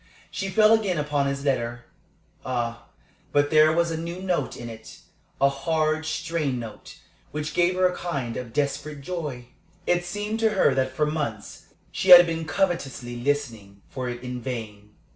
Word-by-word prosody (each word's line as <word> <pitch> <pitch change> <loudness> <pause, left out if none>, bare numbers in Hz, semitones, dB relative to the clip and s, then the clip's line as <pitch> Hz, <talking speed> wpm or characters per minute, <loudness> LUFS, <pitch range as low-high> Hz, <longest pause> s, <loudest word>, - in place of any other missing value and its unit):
She 195 - -3
fell 215 +3 +5
again 205 -6 +1
upon 145 -2 0
his 140 +1 -3
letter. 120 -3 -1 0.6
Ah, 120 -2 -3 0.4
but 145 0 +2
there 155 0 +6
was 170 +1 +1
a 160 - -2
new 170 +2 -5
note 180 -7 -2
in 120 - -7
it 110 -1 -11 0.4
a 140 - +5
hard, 155 +3 0
strained 155 -4 -2
note, 115 -3 -9 0.3
which 150 0 -4
gave 175 +1 +2
her 185 0 +3
a 180 0 +2
kind 140 -11 -3
of 120 -2 -6
desperate 145 +2 -2
joy. 140 -7 -5 0.4
It 175 0 +2
seemed 205 +5 -3
to 225 -1 +3
her 140 - +4
that 130 0 -1
for 150 - +2
months 145 -9 -4 0.2
she 190 - -2
had 175 -1 +12
been 165 -1 -3
covetously 155 -9 -1
listening 120 -7 -3
for 130 -2 -4
it 120 0 -6
in 125 0 -5
vain. 105 -5 -7
145 Hz, 170 wpm, -25 LUFS, 125-170 Hz, 0.6 s, had